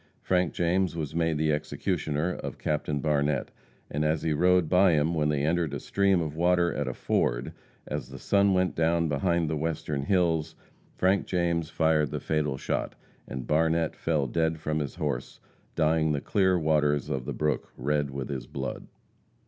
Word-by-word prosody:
Frank 90 -2 +1
James 90 +1 +1
was 75 -3 -4
made 80 -1 +1
the 75 0 +1
executioner 80 +1 -1
of - - -6
Captain 75 -1 -1
Barnette, 75 -2 0 0.4
and 75 +1 -2
as 75 0 0
he 80 - +1
rode 90 +2 +3
by 90 +1 +5
him 80 +2 +2
when 75 -2 +1
they 75 -2 0
entered 80 -2 0
a - - -3
stream 100 +1 +2
of 75 -1 -5
water 85 +1 +2
at 70 -2 -2
a 65 - -2
ford, - - 0 0.3
as - - -5
the - - -9
sun 100 -1 +3
went 90 -2 +1
down 85 0 +2
behind 85 +3 +1
the 80 - -1
western 75 -2 -2
hills, 80 -1 +1 0.4
Frank 95 +2 +2
James 85 -3 0
fired 80 -3 +2
the - - -3
fatal 75 -3 -1
shot, - - -2 0.3
and 65 -2 -5
Barnette 80 +1 +1
fell 75 -4 0
dead 80 +4 0
from 75 0 -1
his 75 -2 -4
horse, - - -3 0.4
dying 80 -1 +2
the 70 - 0
clear 95 +3 +2
waters 75 -3 +1
of 65 -2 -2
the - - -3
brook 75 0 -1
red 75 +2 0
with 70 -1 -5
his 65 -4 -4
blood. - - -5
80 Hz, 180 wpm, -27 LUFS, 75-85 Hz, 0.4 s, by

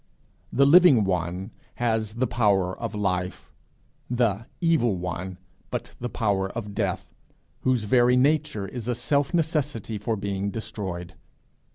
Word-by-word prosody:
The 140 - +4
Living 150 - +7
One 90 +2 -2 0.2
has 110 -2 -1
the 125 +2 +1
power 100 -6 +2
of 115 -3 -5
life; 90 -3 -2 0.6
the 115 -3 0
Evil 160 - +2
One 90 +1 -4 0.3
but - - -5
the 120 - -3
power 100 -5 0
of 105 -3 -5
death - - -2 0.5
whose 130 -3 +1
very 120 +3 +4
nature 145 -6 +1
is 120 +2 -7
a 125 - 0
self 140 +3 0
necessity 150 - -1
for 110 +2 -1
being 100 -1 -2
destroyed. 95 -5 -5
110 Hz, 135 wpm, -25 LUFS, 95-125 Hz, 0.6 s, Living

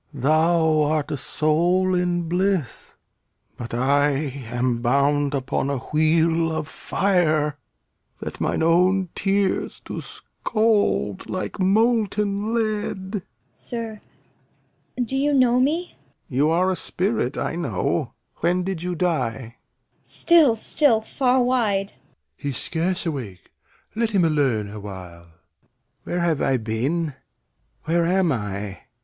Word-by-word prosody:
Thou 155 +3 +3
art 150 0 0
a - - 0
soul 175 +7 +1
in 175 -1 +1
bliss; 180 - -1 0.6
but 120 - -7
I 140 +4 +2 0.4
am 120 0 -1
bound 140 +3 +2
Upon 135 0 -1
a 140 - -1
wheel 160 +4 +2
of 155 -1 -3
fire, 155 -6 0 0.6
that - - -7
mine - - 0
own 180 +3 +3
tears 195 0 0
Do - - -5
scald 215 - -1
like 185 +2 -4
molten 210 0 +1
lead. 215 -4 -2
Cor. 205 -3 -2 0.3
Sir, 225 -3 -6 1.0
do 265 - -3
you 285 +2 +2
know 250 -2 +4
me? 315 +7 0 0.4
Lear. - - -6
You 150 +2 +4
are 180 +3 +2
a - - 0
spirit, 185 - -2
I - - -2
know. 165 -5 -1 0.2
When 180 +2 +1
did 185 -3 -3
you 180 0 -2
die? 125 -9 -2 0.4
Cor. - - -41
Still, 320 -9 +4
still, 230 0 +2
far 255 +2 +1
wide! 215 -6 +1
Doct. - - -22 0.4
He's 140 -4 -3
scarce 180 +3 -2
awake. 120 - -5 0.4
Let 230 0 +1
him 195 -5 +2
alone 135 -9 +1
awhile. 95 -5 -9
Lear. 85 0 -35
Where 175 - -2
have 165 -4 +1
I 135 -1 +2
been? 130 +8 -1 0.7
Where 165 +2 +1
am 185 -2 +2
I? 105 -4 -4
170 Hz, 130 wpm, -23 LUFS, 140-200 Hz, 1.0 s, know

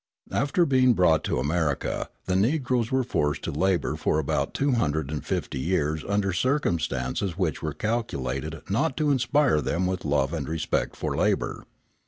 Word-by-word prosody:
After 145 +7 +2
being 130 -4 +4
brought 85 -6 +3
to - - 0
America, 75 +2 -1 0.2
the 90 - 0
Negroes 120 +2 +1
were 130 0 +2
forced 75 - -1
to - - -2
labour 90 +4 +1
for - - 0
about 80 -3 -1
250 80 - -1
years 80 -1 0
under 100 -2 +1
circumstances 90 - 0
which 90 -5 -1
were 75 -2 -3
calculated 80 - -3
not 135 +8 0
to 150 -2 +2
inspire 130 - +3
them 85 +6 0
with 90 -1 -2
love 70 0 +1
and 75 -3 -3
respect 80 -1 -1
for - - -3
labour. - - 0
90 Hz, 150 wpm, -26 LUFS, 75-125 Hz, 0.2 s, being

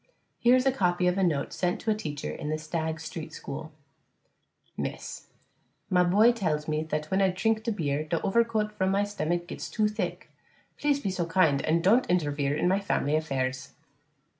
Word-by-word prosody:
Here 245 +1 +5
is 255 +1 +2
a 270 - +5
copy 180 -7 +1
of 180 0 +3
a - - +2
note 150 -6 0
sent 180 -1 -1
to 220 - 0
a - - +2
teacher 150 -8 -4
in 150 - -5
the 155 - 0
Stagg 160 0 -3
Street 160 0 -7
school: 155 +2 -7 1.0
_Miss - - -2
_: - - -8 0.7
My 180 -1 +5
boy 205 +7 +5
tells 155 -10 -1
me 155 0 0
that 155 -1 -3
when 190 +1 +2
I 190 - +4
trink 220 +4 0
beer 145 -4 -1
der 165 +1 -1
overcoat 215 0 +1
vrom 190 0 +2
my 200 +1 +2
stummack 175 -4 -2
gets 175 - -6
to 215 -2 +1
thick. 210 -4 -4 0.5
Please 290 -1 +2
be 200 -8 -2
so 175 -2 -2
kind 160 -5 +3
and 165 +2 +1
don't 225 +8 +4
intervere 145 -5 +1
in - - +1
my 190 +2 +3
family 150 -7 0
afairs. 135 -3 -2
175 Hz, 190 wpm, -28 LUFS, 155-205 Hz, 1.0 s, Here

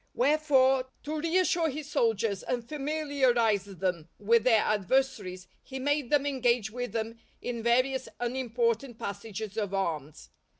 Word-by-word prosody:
Wherefore, 270 -2 +3 0.2
to 305 +1 -3
reassure 335 0 +2
his 295 +1 -6
soldiers 220 -3 +1
and 240 -2 -3
familiarize 270 -8 +1
them 180 -4 -3
with 225 +2 +3
their 225 -4 +5
adversaries, 200 -4 0
he 265 - -8
made 285 -1 0
them 290 -1 +3
engage 245 -6 +1
with 245 +1 -4
them 230 0 -3 0.2
in 240 -2 -4
various 255 +3 +1
unimportant 240 -1 -1
passages 205 +1 -6
of 200 -3 -1
arms. 155 -6 -3
240 Hz, 130 wpm, -29 LUFS, 215-270 Hz, 0.2 s, their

